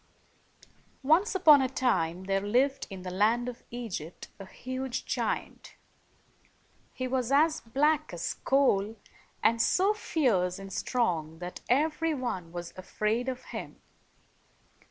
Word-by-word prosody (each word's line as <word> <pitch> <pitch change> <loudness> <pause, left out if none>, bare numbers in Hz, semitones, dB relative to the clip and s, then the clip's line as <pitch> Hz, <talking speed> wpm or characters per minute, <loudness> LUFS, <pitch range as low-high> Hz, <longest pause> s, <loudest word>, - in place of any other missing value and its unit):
Once 330 +10 +3
upon 310 -7 +7
a 260 - 0
time, 185 -10 0
there 195 0 0
lived 255 +7 +1
in 190 -2 -8
the 180 - -5
land 220 +6 +2
of 250 -1 -6
Egypt 215 -9 -6
a 195 - -9
huge 255 +3 -5
giant. - - -3 1.2
He 255 - -4
was 255 -1 -1
as 310 +3 +4
black 295 +6 +1
as 175 -1 -3
coal, 225 -6 +2 0.5
and 230 0 +4
so 385 - +3
fierce 215 - 0
and 195 -1 -9
strong 165 -10 -1
that 180 +1 -7
every 310 +4 +2
one 190 -11 -4
was 175 0 -7
afraid 215 +6 -1
of 255 0 -5
him. - - -7
240 Hz, 130 wpm, -29 LUFS, 190-275 Hz, 1.2 s, upon